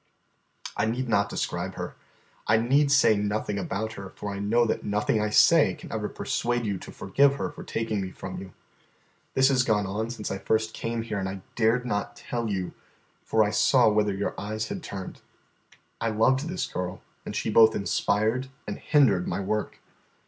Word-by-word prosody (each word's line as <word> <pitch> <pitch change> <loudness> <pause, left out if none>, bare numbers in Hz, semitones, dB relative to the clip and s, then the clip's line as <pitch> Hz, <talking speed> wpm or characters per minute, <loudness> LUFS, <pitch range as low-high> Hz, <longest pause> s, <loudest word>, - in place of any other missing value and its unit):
"I 105 +1 +1
need 125 +3 -1
not 100 -3 +2
describe - - -3
her. - - -5 0.5
I 110 - +5
need 140 +5 +3
say 140 -6 +5
nothing 105 0 -1
about 110 +3 -3
her, 100 -2 -8
for 100 -1 -5
I 100 - -5
know 115 +4 +2
that 110 - -1
nothing 105 +1 +1
I 105 - 0
say 105 - +5
can - - -11
ever - - -2
persuade 120 0 -1
you 100 -3 -2
to - - -10
forgive 140 0 +2
her - - -3
for - - -10
taking 110 -3 -2
me 95 - -4
from - - -7
you. 95 -1 -10 0.8
This 130 0 +5
has 130 -2 +3
gone 105 -4 +1
on 105 +4 -3
since 115 -3 -5
I 95 - -3
first 110 +1 0
came 115 0 -3
here, 110 -3 -3
and 95 0 -2
I 95 -1 -7
dared 115 +3 +2
not 105 -4 -2
tell 120 -2 -4
you, 95 -3 -2 0.5
for 110 -1 +3
I 105 - 0
saw 110 +3 +4
whither 105 -1 +1
your 100 +1 -2
eyes 110 +2 -3
had 200 -2 -4
turned. 95 - -7 0.8
I 115 - +1
loved 130 +7 +2
this 180 +2 -2
girl, 90 0 -5 0.2
and - - -6
she - - -1
both 110 +1 +6
inspired 110 +5 0 0.2
and - - -5
hindered 115 - +3
my - - -2
work. 105 +2 -3
110 Hz, 190 wpm, -27 LUFS, 100-120 Hz, 0.8 s, both